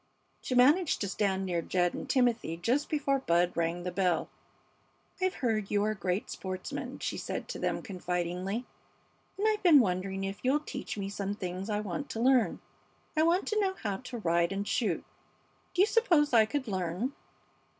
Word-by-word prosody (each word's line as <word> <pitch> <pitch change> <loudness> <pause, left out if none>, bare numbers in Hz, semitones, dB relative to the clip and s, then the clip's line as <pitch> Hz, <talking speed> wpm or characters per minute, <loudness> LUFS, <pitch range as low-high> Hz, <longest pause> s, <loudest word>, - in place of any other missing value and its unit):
She 255 - -2
managed 295 +7 +5
to 200 - 0
stand 195 -1 0
near 175 -2 0
Jed 175 +1 +1
and - - -6
Timothy 235 -10 +1
just 250 - 0
before 280 -3 +1
Bud 175 -6 +2
rang 170 +1 -1
the 180 - -3
bell. 180 -3 +1 0.9
"I've 370 0 +1
heard 215 -4 0
you 205 0 +2
are 215 +1 +1
great 185 0 -2
sportsmen," 185 -1 -5
she - - -3
said - - -4
to - - -5
them, - - -1
confidingly. 180 +4 -3 0.7
"And 415 +2 +1
I've 430 -1 +1
been 335 -6 +7
wondering 190 -2 0
if 195 +1 -4
you'll 265 +4 +3
teach 300 - -6
me 195 -1 -3
some 200 0 -3
things 185 +1 -5
I 210 0 0
want 210 +8 -4
to 225 - -4
learn? 250 -1 +3 0.5
I 310 - +3
want 340 +4 +3
to 430 - +1
know 385 -2 +1
how 205 - -3
to 250 +1 -7
ride 170 -3 +1
and 200 +1 -2
shoot. 205 -9 0 0.7
Do 370 - +6
you - - +6
suppose 340 - +3
I 220 -2 +6
could 260 +2 -2
learn?" 190 +6 -2
205 Hz, 180 wpm, -30 LUFS, 180-270 Hz, 0.9 s, been